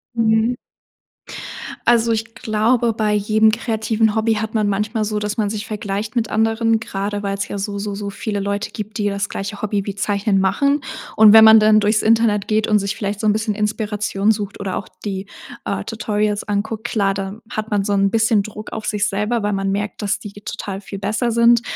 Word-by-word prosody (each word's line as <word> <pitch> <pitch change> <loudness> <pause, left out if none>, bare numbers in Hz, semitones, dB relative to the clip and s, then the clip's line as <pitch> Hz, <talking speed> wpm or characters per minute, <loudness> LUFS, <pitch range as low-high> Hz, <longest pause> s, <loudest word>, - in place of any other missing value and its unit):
Mhm. 225 +1 +2 1.3
Also, 235 -1 +4
ich 225 0 -2
glaube, 225 +2 +1
bei 215 -1 0
jedem 215 +1 +3
kreativen 220 -1 0
Hobby 220 0 +2
hat 220 +1 -3
man 215 -2 +1
manchmal 215 +2 -1
so, 210 0 -2
dass 210 +1 -3
man 210 -2 +1
sich 210 +1 -4
vergleicht 210 +1 -4
mit 235 -2 0
anderen, 225 +1 +2
grade 205 -1 -4
weil's 200 0 -2
ja - - -5
so, 200 0 -3
so, 200 0 -4
so 200 0 -4
viele 205 +1 -3
Leute 200 +1 -2
gibt, 210 -2 -6
die 205 - 0
das 200 0 -2
gleiche 200 +1 -5
Hobby 205 -2 -1
wie 200 - -4
Zeichnen 200 0 0
machen, 280 +10 +2 0.3
und 215 -1 +8
wenn 220 0 +10
man 220 0 +9
dann 215 0 +5
durchs 215 +1 +2
Internet 220 -2 +2
geht 215 0 +1
und 210 -1 +3
sich 200 +1 -2
vielleicht 205 -1 -3
so 215 - 0
'n 210 - +4
bisschen 215 0 -1
Inspiration 210 -1 0
sucht 210 -1 -4
oder 195 -2 -3
auch - - -6 0.2
die, 195 -1 -4 0.4
äh, - - -2
Tutorials 210 -2 -1
anguckt, 215 +1 -2
klar, 200 -4 +1
da 195 +1 -5
hat 215 0 -4
man 205 -1 +1
so 205 - -1
'n 195 0 +2
bisschen 220 -1 +3
Druck 215 +1 -9
auf 220 -1 -5
sich 210 0 0
selber, 210 +4 -1
weil 205 0 0
man 195 0 -1
merkt, 205 0 -3
dass 205 -1 -1
die 205 - -8
ge 205 - -13
total 195 -1 -5
viel 195 -1 -8
besser 215 +4 -1
sind. 235 0 +5
210 Hz, 210 wpm, -20 LUFS, 200-220 Hz, 1.3 s, wenn